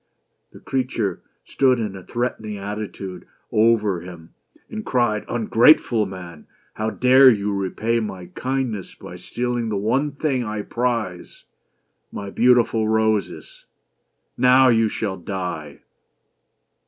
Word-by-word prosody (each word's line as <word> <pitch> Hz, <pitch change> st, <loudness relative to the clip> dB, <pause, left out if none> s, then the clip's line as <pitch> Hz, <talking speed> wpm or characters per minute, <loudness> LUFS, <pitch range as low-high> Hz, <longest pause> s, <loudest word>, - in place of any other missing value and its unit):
The -, -, -14 dB
creature 125 Hz, -6 st, -2 dB, 0.2 s
stood 130 Hz, -2 st, +2 dB
in 105 Hz, -4 st, -3 dB
a 95 Hz, -, -8 dB
threatening 110 Hz, -1 st, -4 dB
attitude 100 Hz, -2 st, -6 dB, 0.2 s
over 105 Hz, -5 st, +2 dB
him 85 Hz, -2 st, -12 dB, 0.3 s
and 215 Hz, -1 st, -6 dB
cried: 120 Hz, -, 0 dB
"Ungrateful 115 Hz, -1 st, +4 dB
man! 90 Hz, -4 st, -10 dB
— -, -, -37 dB
how 110 Hz, 0 st, -2 dB
dare 130 Hz, +3 st, +6 dB
you 105 Hz, -3 st, 0 dB
repay 105 Hz, +4 st, -1 dB
my 95 Hz, -5 st, -5 dB
kindness 125 Hz, -7 st, -3 dB
by -, -, -10 dB
stealing 120 Hz, -1 st, -3 dB
the 105 Hz, -, -1 dB
only 135 Hz, +8 st, 0 dB
thing 140 Hz, -4 st, -1 dB
I 105 Hz, -2 st, -4 dB
prize, 115 Hz, -8 st, -3 dB, 0.7 s
my 100 Hz, -1 st, -6 dB
beautiful 120 Hz, -2 st, +3 dB
roses? 110 Hz, -1 st, -1 dB, 0.4 s
— -, -, -51 dB
Now 130 Hz, +1 st, +6 dB
you 115 Hz, -2 st, +3 dB
shall 100 Hz, -3 st, -3 dB
die 90 Hz, -5 st, -6 dB
110 Hz, 125 wpm, -22 LUFS, 100-125 Hz, 0.7 s, dare